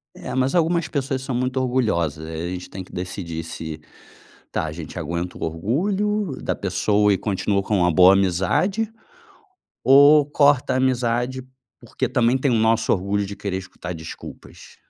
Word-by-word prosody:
É, - - -7
mas 130 +5 +1
algumas 170 0 +2
pessoas 135 -2 -2
são 130 -2 -4
muito 130 +1 -1
orgulhosas, 105 - 0
eh, 80 +1 -4
a - - -4
gente 90 0 -6
tem 95 0 -7
que - - -18
decidir 90 -2 -5
se: 80 -1 -7 0.7
"Tá, - - -1
a 75 - -4
gente 80 -1 -8
aguenta 85 +1 -4
o - - -6
orgulho 185 - -1
da - - -1
pessoa 105 +2 +1
e 95 - +2
continua 100 -1 -1
com 105 0 0
uma 90 0 +3
boa 90 +3 +7
amizade 100 - +1 0.9
ou 145 +2 +7
corta 145 -3 +3
a - - +1
amizade 125 0 0 0.4
porque 120 +1 -3
também 120 0 +2
tem 135 +1 0
o - - +2
nosso 115 0 +2
orgulho 100 +1 0
de 100 +1 -7
querer 100 -2 -3
escutar 90 -1 -8
desculpas?". 80 -1 -11
110 Hz, 170 wpm, -22 LUFS, 90-130 Hz, 0.9 s, boa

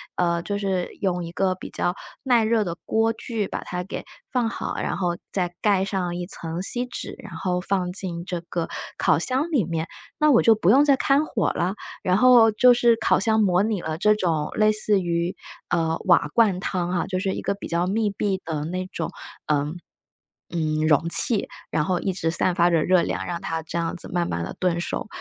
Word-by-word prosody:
呃， 170 -1 +1
就 200 +4 -3
是 190 -3 -1
用 180 -3 0
一 170 - -7
个 190 0 +1
比 185 - -9
较 175 - -1 0.3
耐 245 -4 +3
热 220 0 +2
的 175 -4 -3
锅 225 +1 +1
具 225 -3 -3
把 - - -5
它 180 0 -4
给 195 - -6 0.3
放 245 -4 +1
好， - - -4
然 - - -2
后 175 -2 0 0.2
再 180 -2 -1
盖 200 -3 +2
上 185 -3 -2
一 175 - -4
层 170 -1 -4
锡 245 +5 0
纸， - - -6
然 210 -5 -10
后 180 +1 -1
放 185 -2 -1
进 180 -3 -3
这 180 -3 -4
个 170 -2 -2 0.3
烤 150 - +3
箱 265 - -1
里 270 -9 +2
面， 165 0 -3 0.3
那 300 -1 +4
我 235 - +5
就 225 -1 +5
不 200 -2 +3
用 275 +4 +6
再 280 -2 +5
开 275 +1 +3
火 220 - -1
了。 180 +3 -1 0.3
然 185 +1 +2
后 245 -2 +7
就 250 +3 +6
是 235 -1 +4
烤 - - +2
箱 220 -1 +2
模 185 -3 +3
拟 210 -4 -1
了 160 +1 -4
这 210 +1 +4
种 165 -7 -1
类 215 0 +4
似 210 -2 +2
于， 170 0 -1 0.3
呃， 165 -2 +1
瓦 175 -2 +4
罐 210 -6 +3
汤 180 -2 -2
哈， 175 -2 0
就 185 -1 -2
是 190 0 -1
一 - - -4
个 - - 0
比 200 - -8
较 170 +1 0
密 210 +3 0
闭 195 -1 -2
的 155 -2 -3
那 185 +2 -4
种， 165 - -4 0.3
呃， 150 0 0 0.8
嗯， 155 -1 0
容 160 +2 +3
器， 215 +4 +4 0.2
然 150 - +1
后 180 +1 0
一 190 - -2
直 165 -2 -1
散 175 +2 +1
发 175 0 +3
着 165 -3 +2
热 185 -1 +4
量， - - -3
让 170 -1 -4
它 165 0 -3
这 160 - -9
样 165 0 -2
子 - - -5
慢 175 -1 0
慢 85 0 -2
地 - - -6
炖 180 -2 +1
熟。 175 - -3
185 Hz, 235 characters per minute, -24 LUFS, 170-215 Hz, 0.8 s, 后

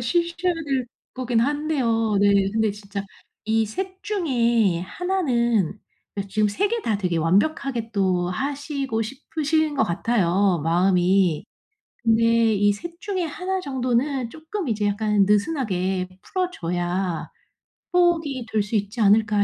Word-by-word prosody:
쉬셔야 345 +7 0
될 275 -6 -2 0.3
거긴 245 -3 0
한데요. 250 -6 +1
네. 200 -1 +4
근데 220 -1 +2
진짜 200 -1 -6 0.4
이 220 0 +2
3 375 - -5
중에 235 - +1
1 360 - -2
는 235 - +1 0.4
그러니까 200 -1 -4
지금 215 +1 +2
3 395 - 0
개 465 -1 -1
다 220 - 0
되게 180 -4 -1
완벽하게 225 - +1
또 185 -3 +1
하시고 275 0 -2
싶으신 300 +5 -1
것 275 - +2
같아요 190 -2 +1
마음이. 180 0 +2 0.6
근데 230 -1 +3
'이 205 +1 +3
3 340 +11 -8
중에 380 -4 -2
1 370 +4 -3
정도는 255 -2 -1
쪼끔 320 +1 -5
이제 210 -2 0
약간 205 -1 +2
느슨하게 200 - 0
풀어 370 -1 -2
줘야 175 - -2 0.7
호흡이 325 -8 +2
될 215 -1 +2
수 205 +3 -4
있지 205 +3 -3
않을까.' 210 0 +4
225 Hz, 240 characters per minute, -23 LUFS, 200-295 Hz, 0.7 s, 네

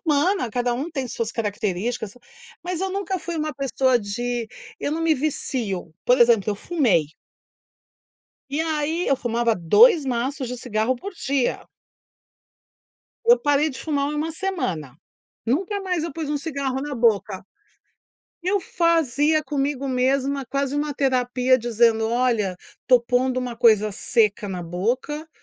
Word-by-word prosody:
humana 305 - +1
cada 245 +2 0
um 290 +7 -4
tem 270 -4 -3
suas 230 -1 -3
características 215 0 -3 0.5
mas 360 0 -3
eu 385 0 -1
nunca 390 -1 -2
fui 345 -1 -5
uma 310 -1 -2
pessoa 260 -2 +1
de 235 +3 -3 0.3
eu 285 - -1
não 320 - -2
me 330 -1 +3
vicio, 230 - -3
por 250 +1 +4
exemplo, 230 -3 +5
eu 205 - -2
fumei. 205 - +1 1.4
E 290 - -1
aí, 320 +2 -1
eu 275 - +3
fumava 235 -2 0
2 310 - +5
maços 260 +1 -2
de 250 - -5
cigarro 235 +1 -1
por 390 +10 -8
dia. 270 -4 -1 1.6
Eu 480 +1 +6
parei 290 +1 +2
de 260 - -8
fumar 285 -3 -1
1 300 +2 -2
semana. 190 - -3 0.5
Nunca 380 - 0
mais 360 -4 -1
eu 335 - -3
pus 320 -3 -4
um 295 - 0
cigarro 275 -3 -3
na 290 -2 -4
boca. 210 -5 +1 1.0
Eu 380 +3 +1
fazia 315 -4 +2
comigo 275 -1 -2
mesma 265 +1 0
quase 275 +2 -2
uma 290 0 -1
terapia 255 -1 +2
dizendo: 230 -1 +2
"Olha, 230 -6 +1 0.3
tô 250 -1 +6
pondo 250 +2 0
uma 245 -2 -4
coisa 215 -3 +4
seca 210 -1 +1
na 180 -2 -4
boca, 245 - -2
260 Hz, 145 wpm, -23 LUFS, 230-300 Hz, 1.6 s, Eu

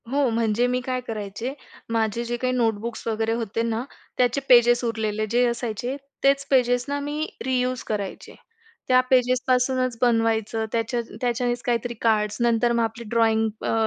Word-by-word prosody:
हो. 275 0 +2
म्हणजे 230 +1 +1
मी 250 0 0
काय 255 0 -2
करायचे, 215 +3 -4 0.4
माझे 225 0 0
जे 240 +1 -2
काही 255 +1 -1
नोटबुक्स 230 -2 -1
वगैरे 225 0 0
होते 230 -1 -2
ना, 230 0 -1 0.3
त्याचे 250 +2 +2
पेजेस 240 0 +6
उरलेले 215 -2 -1
जे 245 +1 +3
असायचे, 240 +1 -3 0.3
तेच 275 0 +3
पेजेस 245 -2 +3
ना 285 0 -1
मी 295 +2 -3 0.2
रियूज 255 -1 0
करायचे. 205 -3 -4 0.5
त्या 255 -1 +5
पेजेस 250 -1 +3
पासूनच 255 -1 +1
बनवायचं 225 -2 +1
त्याच्या 230 +1 -1 0.2
त्याच्यानेच 245 0 0
काहीतरी 240 0 -1
कार्ड्स 210 -2 +1
नंतर 235 0 +3
मग 235 -1 +2
आपली 225 +1 -4
ड्रॉइंग 225 -1 +3 0.2
अ, - - 0
235 Hz, 155 wpm, -24 LUFS, 225-250 Hz, 0.5 s, पेजेस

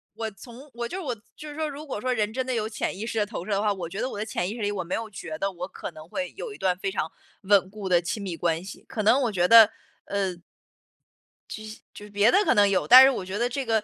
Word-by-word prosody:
我 225 -1 -4
从 240 +8 -13
我 235 0 -4
就 370 - -5
是 - - -4
我 260 -5 -2 0.2
就 300 - -9
是 290 - -9
说 310 0 -2
如 295 +2 -8
果 260 - -5
说 255 +3 0
人 215 -3 0
真 260 +1 -2
的 260 - -2
有 220 -2 -1
潜 215 - -3
意 215 - -4
识 225 - -4
的 210 - +2
投 200 - -6
射 215 - -5
的 200 0 +1
话， 210 -1 +2
我 175 -4 -6
觉 195 +5 -6
得 255 - -1
我 210 - -7
的 210 - -3
潜 185 -4 -2
意 - - -4
识 235 - -7
里 205 - 0
我 195 -3 -3
没 180 - -2
有 225 -1 -4
觉 170 -6 -7
得 195 - -1
我 180 0 -6
可 190 - -7
能 155 -1 -12
会 275 +9 -4
有 465 -4 -6
一 - - -11
段 180 -1 0
非 195 - -2
常 165 -5 -3 0.3
稳 195 -1 +3
固 200 -1 -6
的 175 -1 +4
亲 200 +4 -4
密 175 -4 -4
关 165 0 0
系。 195 - -10
可 215 - -3
能 230 +6 +4
我 240 -4 0
觉 180 -3 +2
得 225 -2 +9 0.4
呃 195 -3 -2 1.1
就 215 - -7
西 215 0 -10
就 205 - -11
是 210 - -12
别 205 +3 +4
的 385 - +4
可 - - +3
能 205 -2 +5
有， 195 -2 +1
但 255 +2 +11
是 270 - +6
我 195 - -3
觉 190 +2 -4
得 240 +2 +1
这 270 +2 -3
个， 225 -2 +1
210 Hz, 330 characters per minute, -26 LUFS, 190-240 Hz, 1.1 s, 但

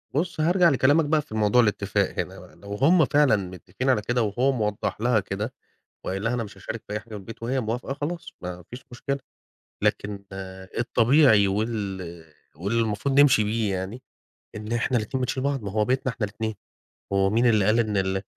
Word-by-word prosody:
بُص، 165 +1 -1
هارجع 175 +1 +4
لكلامك 145 +3 +3
بقى 155 +1 +2
في 110 -7 -10
موضوع 110 +3 +4
الاتفاق 100 -3 0
هنا - - -4
بقى. - - -15
لو 100 0 -9
هم 155 - +5
فعلًا 145 -4 +4
متفقين 95 +6 -4
على 110 -5 +3
كده، 120 +3 0
وهو 120 +6 +1
موضح 105 -3 -2
لها 120 -2 +3
كده 105 +6 -4 0.5
وقايل 95 +2 -3
لها 115 +1 0
أنا 120 -2 -1
مش 105 - -11
هاشارك 110 -1 -6
في 105 - -6
أي 105 - -1
حاجة 110 +2 -19
في 105 - -7
البيت، 115 +3 -9
وهي 130 +3 0
موافقة، 120 +4 -3
خلاص 160 +4 -5
ما 90 -1 -6
فيش 125 +1 -10
مشكلة. 140 +3 -3 0.6
لكن 100 -1 -1 0.5
الطبيعي 115 -2 +4
وال 95 -5 -3 0.3
والمفروض 115 - 0
نمشي 135 -7 +6
بيه 105 -1 0
يعني، 95 +7 -5 0.5
إن 105 +1 -6
إحنا 120 +1 +1
الاتنين 120 +5 -3
بنشيل 130 +1 -2
بعض، 140 -4 -1
ما 100 - -4
هو 105 +1 +1
بيتنا 130 0 0
إحنا 110 - -3
الاتنين. 110 +2 -4 0.6
هو 95 0 +3
مين 115 +3 +2
اللي 110 -4 +4
قال 110 +3 +3
إن 110 -3 +1
ال 95 0 0
110 Hz, 190 wpm, -25 LUFS, 100-130 Hz, 0.6 s, نمشي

